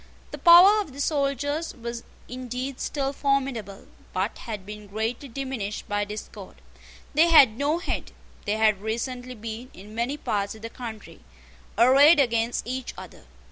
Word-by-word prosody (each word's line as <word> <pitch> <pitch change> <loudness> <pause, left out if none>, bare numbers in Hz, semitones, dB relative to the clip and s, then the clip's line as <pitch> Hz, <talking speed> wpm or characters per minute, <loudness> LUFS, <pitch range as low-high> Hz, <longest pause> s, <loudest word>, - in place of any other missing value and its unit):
The - - -7
power 370 +5 +8
of 305 -10 -8
the 280 - -10
soldiers 285 +2 -1
was 235 -1 -6 0.3
indeed 255 +1 -5
still 275 -2 -2
formidable, 270 -8 -2 0.3
but 190 +4 -1
had 210 -5 -6
been 210 0 -9
greatly 225 +6 -3
diminished 245 -5 -5
by 205 0 -1
discord. 210 +1 -9 0.6
They 315 +4 +5
had 275 -9 +7
no 285 +5 0
head. 345 - -4 0.3
They 205 - 0
had 215 -3 +2
recently 245 +3 -4
been, 225 +3 -7
in 205 +3 -12
many 240 +6 -2
parts 205 -6 -2
of 220 - -15
the 230 - -6
country, 225 -4 -9 0.6
arrayed 280 +6 +7
against 235 -3 +1
each 255 +1 -5
other. - - -11
245 Hz, 150 wpm, -25 LUFS, 220-275 Hz, 0.6 s, power